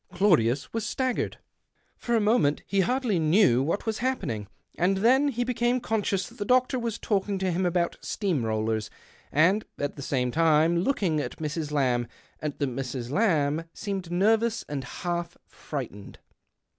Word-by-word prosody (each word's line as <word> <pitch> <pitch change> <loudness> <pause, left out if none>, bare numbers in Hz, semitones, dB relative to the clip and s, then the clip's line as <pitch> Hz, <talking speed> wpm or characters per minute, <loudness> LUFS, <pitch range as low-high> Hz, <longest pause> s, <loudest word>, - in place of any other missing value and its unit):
Claudius 155 - +2
was 225 -1 -1
staggered; 255 +3 -1 0.6
for 235 - -1
a - - +4
moment 210 -9 +2
he 200 - 0
hardly 230 -1 +1
knew 160 - +4
what 165 - -1
was 220 -1 -2
happening, 120 - -2 0.3
and 190 +3 +2
then 255 +8 +4
he 245 -3 0
became 245 0 +1
conscious 205 -5 -1
that - - -16
the - - 0
doctor 255 +3 +2
was 230 -2 -3
talking 200 -1 -1
to 190 -1 0
him 180 +2 +1
about 175 -1 0
steam 180 - -1
rollers 110 -1 -1 0.4
and, 185 +8 +3
at 145 +1 -3
the - - -6
same 125 -2 -1
time 165 +2 +3
looking 180 - +1
at - - -4
Mrs. 155 0 -3
Lamb, 125 -5 +1 0.3
and 150 -2 -4
that 140 - 0
Mrs. 125 -1 -4
Lamb 160 -5 +1
seemed 195 -4 -4
nervous 220 +5 +2
and 140 -2 -4
half 170 +5 -4
frightened. 120 -9 -7
175 Hz, 160 wpm, -27 LUFS, 145-220 Hz, 0.6 s, a